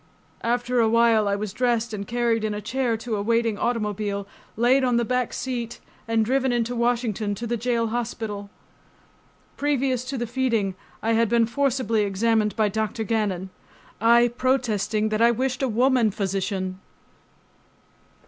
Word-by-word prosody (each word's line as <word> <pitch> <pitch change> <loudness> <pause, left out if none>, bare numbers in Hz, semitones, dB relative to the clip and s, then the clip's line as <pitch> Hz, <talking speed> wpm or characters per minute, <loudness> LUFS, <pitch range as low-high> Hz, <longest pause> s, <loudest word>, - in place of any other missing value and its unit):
After 245 +1 0
a 225 -1 +4
while 230 -2 +4
I 200 - +1
was 200 -1 -4
dressed 240 -2 0
and 200 -2 -5
carried 235 -1 0
in 215 -1 -1
a - - -3
chair 235 +2 -1
to 225 -1 -3
a - - -2
waiting 230 0 +1
automobile, 210 -3 -2 0.3
laid 250 +4 +4
on 250 -2 +2
the 235 - +1
back 250 0 0
seat 240 -3 -4 0.3
and 225 -1 +2
driven 265 +2 +1
into 240 0 0
Washington 235 -4 0
to 235 - -5
the 235 +1 -1
jail 230 0 0
hospital. 220 -3 -4 1.1
Previous 270 -4 0
to 270 +1 -4
the 240 - -2
feeding 230 -5 0 0.3
I 225 +1 +2
had 225 -1 +2
been 235 0 +4
forcibly 255 -3 0
examined 210 +2 +1
by 215 -1 +2
Dr. 220 +2 -2
Gannon, 200 -4 -1 0.5
I 235 +1 +5
protesting 225 -5 0
that 215 +1 -1
I 235 - +6
wished 255 +2 -1
a 265 - +2
woman 245 0 +3
physician. 190 -2 -2
230 Hz, 160 wpm, -24 LUFS, 215-245 Hz, 1.1 s, I